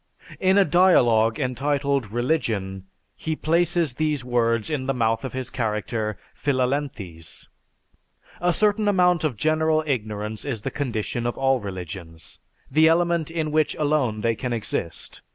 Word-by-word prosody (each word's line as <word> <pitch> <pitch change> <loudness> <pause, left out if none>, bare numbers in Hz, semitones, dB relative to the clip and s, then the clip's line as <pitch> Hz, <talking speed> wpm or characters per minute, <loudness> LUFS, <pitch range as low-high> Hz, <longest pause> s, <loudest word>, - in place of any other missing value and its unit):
In 190 +1 +3
a 200 - +6
dialogue 120 -11 +4
entitled 140 -1 0
"Religion," 110 -7 -1 0.3
he 160 0 -3
places 170 -2 +1
these 150 -2 -1
words 115 -1 +1
in 135 -4 -2
the 135 - 0
mouth 115 -1 +1
of 130 - -5
his 130 -1 -4
character 105 -2 -2 0.2
Philalethes: 125 - -3 0.9
"A 175 0 +3
certain 210 +3 +2
amount 180 -4 +3
of 145 -8 -1
general 155 +2 +2
ignorance 110 -5 -3
is 120 -7 -4
the - - -3
condition 120 -3 -2
of 120 - -3
all 135 -1 +2
religions, 90 -4 -7 0.3
the 155 +3 +5
element 170 -1 +2
in 160 -2 -2
which 155 0 +1
alone 145 -8 0
they 115 +1 +2
can 125 +2 -3
exist. 105 -7 -4
130 Hz, 140 wpm, -24 LUFS, 110-155 Hz, 0.9 s, a